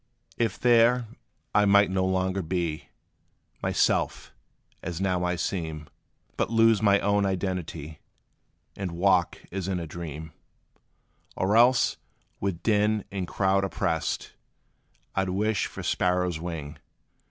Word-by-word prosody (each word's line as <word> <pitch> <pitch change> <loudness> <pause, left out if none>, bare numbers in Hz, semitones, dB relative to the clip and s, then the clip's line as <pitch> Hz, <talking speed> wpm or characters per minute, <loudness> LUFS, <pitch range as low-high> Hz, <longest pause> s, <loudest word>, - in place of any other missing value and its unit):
If 115 -5 -1
there, 120 0 +4 0.5
I 105 - +4
might 100 -1 +5
no 95 0 +1
longer 95 +1 0
be 85 -2 -3 0.7
Myself, - - 0 0.5
as 90 -1 -5
now 90 -2 0
I 90 0 0
seem, 80 -4 -3 0.5
But - - 0
lose 115 -1 +4
my 100 -2 +4
own 100 0 +2
identity, 90 -5 -3 0.8
And 95 -3 -4
walk, 90 0 +2
as 95 0 -3
in 95 -2 -1
a 85 - -4
dream; 80 -1 -7 1.0
Or 100 +3 +1
else, 120 +2 +4 0.4
with 95 -4 -3
din 105 -1 +2
and 95 -2 -3
crowd 95 +1 +1
oppressed, 85 -3 -2 0.8
I 95 - +1
'd 95 - -3
wish 105 +3 0
for - - -8
sparrow's 90 -2 0
wing. 80 -3 -6
95 Hz, 125 wpm, -27 LUFS, 85-100 Hz, 1.0 s, might